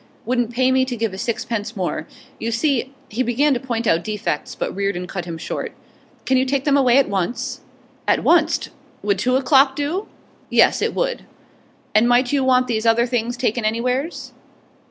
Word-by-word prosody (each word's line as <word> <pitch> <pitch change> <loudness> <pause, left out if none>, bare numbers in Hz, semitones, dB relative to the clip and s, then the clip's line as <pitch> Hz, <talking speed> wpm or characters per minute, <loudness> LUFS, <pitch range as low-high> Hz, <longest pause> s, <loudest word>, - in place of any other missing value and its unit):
'Wouldn't 245 0 0
pay 255 +2 +2
me 260 0 +3
to 255 -1 -3
give 225 -3 -2
a - - -6
sixpence 230 -1 -3
more. 185 -2 -2 0.3
You 230 - -2
see 265 +2 0
' - - -31
He 225 +4 -2
began 260 +4 +2
to 250 - -1
point 235 -3 -3
out 170 -5 +2
defects, 210 -8 -3
but - - -4
Reardon 195 -2 -1
cut 180 -1 -5
him 170 -2 -6
short. - - -5 0.5
'Can 260 - +3
you 260 - +2
take 270 0 0
them 285 -1 +3
away 260 -3 +4
at 275 - +4
once?' 195 +4 -2 0.5
'At - - +2
wunst? - - +3 0.3
Would 200 -2 +1
two 255 +5 +1
o'clock 270 0 +4
do?' 320 +9 -2 0.4
'Yes, - - +4
it - - -1
would.' - - -1 0.7
'And 220 +3 +4
might 245 +1 +3
you 275 -2 +2
want 255 -1 +4
these 230 -2 -1
other 230 +1 +4
things 240 0 -2
takin' 240 -2 0
anywheres? 250 +8 -2
245 Hz, 190 wpm, -21 LUFS, 220-260 Hz, 0.7 s, away